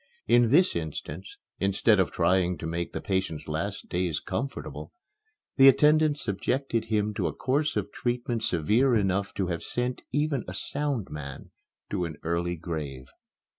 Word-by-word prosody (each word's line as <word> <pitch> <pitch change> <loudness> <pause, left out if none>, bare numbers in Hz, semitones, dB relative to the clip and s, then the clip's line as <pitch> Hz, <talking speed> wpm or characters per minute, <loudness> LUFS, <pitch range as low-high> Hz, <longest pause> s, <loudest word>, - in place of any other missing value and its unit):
In 120 -1 +5
this 175 +9 +4
instance, 80 +2 -5 0.2
instead 100 +2 +3
of 95 - +3
trying 90 0 +2
to - - -7
make 85 +1 -3
the - - -4
patient's 95 -5 -2
last 95 +7 -3
days 90 -4 -1
comfortable, 140 0 -5 0.7
the 135 0 +8
attendants 150 +2 +5
subjected 115 +4 -1
him 105 -1 0
to - - -1
a - - -3
course 145 +4 0
of 105 0 -2
treatment 120 -1 -2
severe 115 - +2
enough 100 -1 +1
to 95 - 0
have 85 -2 -3
sent 125 +1 -2
even 145 -3 0
a 90 - -6
sound 140 0 -2
man 70 -3 -7 0.4
to 90 - 0
an 80 -2 -6
early 85 +1 -1
grave. 75 -6 -5
100 Hz, 155 wpm, -27 LUFS, 85-125 Hz, 0.7 s, the